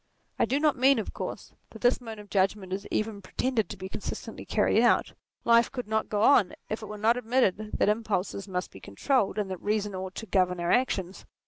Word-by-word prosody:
I - - +4
do 275 - 0
not 300 -4 +2
mean, 270 +2 +5
of 220 - -3
course, - - -6 0.2
that - - -13
this 245 +1 +3
mode 225 -2 -7
of 205 -1 -12
judgment 195 -1 0
is 195 +1 -4
even 215 -2 -2
pre 185 - -17
tended 250 -4 +1
to 205 - -7
be 190 0 -6
consistently - - -6
carried - - +2
out: - - +3 0.3
life 235 0 +5
could 250 -4 -5
not 220 0 -1
go 210 0 0
on 225 -9 +5 0.2
if 215 - -3
it 215 - -7
were 210 +1 -7
not 225 +3 +3
admitted 220 -4 0
that - - +2
impulses 210 -2 -1
must 180 -1 -3
be 95 - -12
controlled, 205 - 0
and 200 -2 -2
that 185 - -5
reason 210 -1 -1
ought 185 0 -5
to 225 - -6
govern 180 -2 +1
our 175 0 0
actions. 195 -7 0
210 Hz, 225 wpm, -28 LUFS, 190-235 Hz, 0.3 s, mean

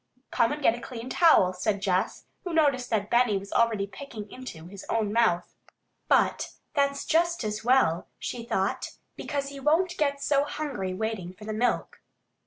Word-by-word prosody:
"Come 230 - +2
and 295 0 -4
get 225 - +5
a 240 - -7
clean 240 0 -7
towel," 255 - +5
said 200 +2 -1
Jess, 190 -2 -1 0.2
who 355 - -4
noticed 275 -6 +2
that 210 -2 -1
Benny 240 -4 +4
was 195 +1 -7
already 225 -4 +2
"picking 215 -1 -9
into" 215 -11 -9
his 195 +2 -10
own 215 -2 0
mouth. 215 -7 +2 0.5
"But - - +2 0.2
that's 280 -1 +1
just 340 0 +2
as 210 0 -3
well," 235 -9 +3
she 240 -2 -5
thought. 195 -4 -1 0.2
"Because 280 -1 -3
he 280 0 -8
won't 335 +6 +2
get 280 -2 +1
so 280 0 +2
hungry 285 -11 -3
waiting 205 -4 -3
for 210 +3 -12
the 215 - -3
milk." 240 +3 -1
235 Hz, 175 wpm, -27 LUFS, 200-280 Hz, 0.5 s, get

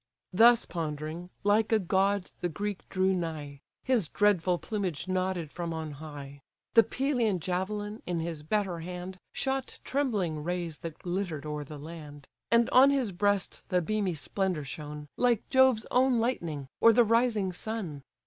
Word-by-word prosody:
Thus 230 +4 +6
pondering, 160 +1 -4
like 210 +2 +3
a 220 - +6
god 195 0 +1
the 175 - 0
Greek 205 +4 -4
drew 190 0 +2
nigh; 155 -5 -4 0.2
His 245 -10 +2
dreadful 185 -3 +2
plumage 190 -5 -3
nodded 185 -4 -1
from 170 -2 -4
on 160 -1 -4
high; 140 -2 -9 0.3
The 230 - +9
Pelian 240 -6 0
javelin, 205 +5 -3
in 175 -2 -1
his 165 -2 -4
better 185 +1 -1
hand, 180 +2 -7
Shot 270 0 -2
trembling 205 - -1
rays 175 -2 -3
that 165 -2 -7
glitter'd 175 -5 -3
o'er 150 -1 -3
the 150 +1 -9
land; 145 -2 -10 0.2
And 235 0 +4
on 265 +2 +8
his 265 -7 +1
breast 205 +1 0
the 180 - +3
beamy 195 0 -1
splendour 180 +1 -1
shone, 150 +1 -7
Like 240 -3 +2
Jove's 260 -4 +5
own 255 0 +4
lightning, 170 - -2
or 230 - +7
the 240 - +6
rising 225 -4 +2
sun. 185 -8 -5
185 Hz, 155 wpm, -29 LUFS, 160-215 Hz, 0.3 s, The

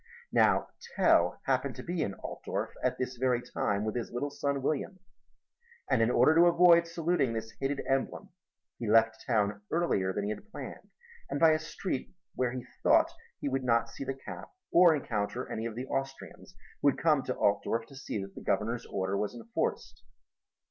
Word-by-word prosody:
Now - - +3 0.3
Tell - - +4
happened - - 0
to - - -8
be 175 -1 -2
in 100 -9 -2
Altdorf - - -5
at - - +1
this 130 0 -3
very 125 -1 +2
time 100 -3 -2
with 110 - -2
his 120 - -3
little 140 +4 -3
son 140 -1 -2
William; 155 +6 -1 0.9
and 115 - +4
in 115 - +3
order 125 +5 +5
to 170 +2 +6
avoid 170 0 +6
saluting 165 -6 0
this 110 0 -5
hated 135 +1 -1
emblem, 135 +9 -1 0.5
he 115 - -3
left 110 0 +4
town 105 -3 +1
earlier 160 - +1
than 100 +2 -2
he 105 - -1
had 205 - -8
planned - - -8 0.4
and 140 - -2
by 165 -1 +7
a 155 - +2
street 165 0 -5 0.2
where 125 -1 0
he 130 -1 -6 0.2
thought - - +4 0.3
he - - -3
would 135 -1 -1
not 115 -2 +2
see - - -6
the 135 0 -3
cap 135 - -9 0.2
or 170 -2 +7
encounter 105 -7 -3
any 110 +1 -2
of 110 - -7
the 125 +2 -4
Austrians 135 0 -5 0.3
who 145 - +5
had - - -2
come 155 -4 +3
to 130 - -3
Altdorf 115 +3 +1
to 135 - -15
see 135 -5 -4
that 95 0 -10
the - - -9
Governor's 115 +4 -1
order 95 0 -2
was 105 +3 -2
enforced. 115 -1 -3
130 Hz, 190 wpm, -30 LUFS, 110-150 Hz, 0.9 s, by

